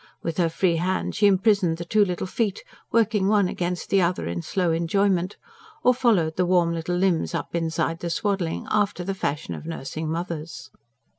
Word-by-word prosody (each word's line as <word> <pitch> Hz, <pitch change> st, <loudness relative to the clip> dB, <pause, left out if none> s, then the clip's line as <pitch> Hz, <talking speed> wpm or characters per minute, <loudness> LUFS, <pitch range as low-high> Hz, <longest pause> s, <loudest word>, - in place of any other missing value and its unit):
With 165 Hz, -1 st, -3 dB
her 170 Hz, -2 st, +2 dB
free 170 Hz, +1 st, +1 dB
hand 185 Hz, +3 st, -1 dB
she 205 Hz, -, +4 dB
imprisoned 195 Hz, -3 st, +3 dB
the 170 Hz, -, -6 dB
two 210 Hz, +4 st, +3 dB
little 180 Hz, -3 st, -2 dB
feet, 205 Hz, +1 st, -2 dB, 0.3 s
working 215 Hz, -3 st, +2 dB
one 205 Hz, -2 st, +3 dB
against 175 Hz, 0 st, -3 dB
the 195 Hz, -, +4 dB
other 175 Hz, +1 st, 0 dB
in 85 Hz, 0 st, -3 dB
slow 180 Hz, -, 0 dB
enjoyment; 180 Hz, +3 st, +1 dB, 0.5 s
or 250 Hz, -, +5 dB
followed 205 Hz, -11 st, +2 dB
the 180 Hz, -, +2 dB
warm 175 Hz, -2 st, +3 dB
little 165 Hz, +2 st, -2 dB
limbs 180 Hz, -2 st, +1 dB
up -, -, -4 dB
inside 165 Hz, 0 st, -1 dB
the 170 Hz, -, -3 dB
swaddling, 190 Hz, -2 st, -1 dB
after 205 Hz, -4 st, +1 dB
the 195 Hz, +2 st, -2 dB
fashion 150 Hz, -5 st, -3 dB
of 155 Hz, -, -8 dB
nursing 155 Hz, 0 st, -5 dB
mothers. 160 Hz, -5 st, -5 dB
180 Hz, 180 wpm, -24 LUFS, 165-195 Hz, 0.5 s, or